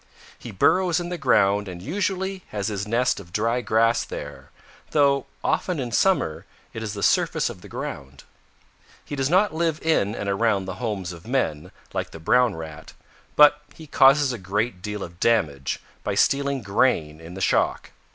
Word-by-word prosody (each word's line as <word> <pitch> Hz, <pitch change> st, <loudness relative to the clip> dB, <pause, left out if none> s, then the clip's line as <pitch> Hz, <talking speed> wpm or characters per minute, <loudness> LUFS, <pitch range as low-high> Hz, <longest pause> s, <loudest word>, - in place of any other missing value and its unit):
He -, -, -9 dB
burrows 175 Hz, -, +2 dB
in 175 Hz, 0 st, -5 dB
the 180 Hz, -, -3 dB
ground 105 Hz, -7 st, +3 dB
and 90 Hz, -2 st, -7 dB
usually 190 Hz, -, -2 dB
has 105 Hz, +1 st, -3 dB
his 100 Hz, -1 st, -4 dB
nest 120 Hz, +2 st, +1 dB
of 85 Hz, -3 st, -13 dB
dry 115 Hz, +5 st, 0 dB
grass 115 Hz, 0 st, +2 dB
there, -, -, -8 dB, 0.4 s
though 140 Hz, -2 st, +2 dB, 0.2 s
often 180 Hz, -5 st, 0 dB
in 125 Hz, -3 st, -3 dB
summer 115 Hz, -, +1 dB, 0.3 s
it 115 Hz, -, -6 dB
is 110 Hz, -1 st, -4 dB
the 100 Hz, -, -5 dB
surface -, -, +2 dB
of -, -, -12 dB
the -, -, -12 dB
ground. 65 Hz, 0 st, -7 dB, 0.8 s
He 145 Hz, -, -5 dB
does 135 Hz, -1 st, 0 dB
not 190 Hz, +3 st, +3 dB
live 160 Hz, -1 st, 0 dB
in 115 Hz, -10 st, +1 dB
and 100 Hz, -, -4 dB
around 100 Hz, -1 st, +1 dB
the 95 Hz, -, -6 dB
homes 100 Hz, -6 st, -3 dB
of 85 Hz, +4 st, -13 dB
men, 80 Hz, -, -1 dB, 0.2 s
like -, -, -3 dB
the 80 Hz, -, -11 dB
Brown 125 Hz, +6 st, +3 dB
Rat, 80 Hz, -1 st, -9 dB, 0.4 s
but 150 Hz, 0 st, +6 dB
he 160 Hz, -, -11 dB
causes 140 Hz, -1 st, +4 dB
a 120 Hz, -, -6 dB
great 100 Hz, +1 st, -2 dB
deal 105 Hz, 0 st, -4 dB
of 85 Hz, +1 st, -10 dB
damage 75 Hz, -13 st, +1 dB, 0.2 s
by -, -, -2 dB
stealing 140 Hz, -2 st, +1 dB
grain 85 Hz, -7 st, +1 dB
in 85 Hz, +2 st, -10 dB
the -, -, -7 dB
shock. -, -, +1 dB
115 Hz, 180 wpm, -24 LUFS, 95-140 Hz, 0.8 s, but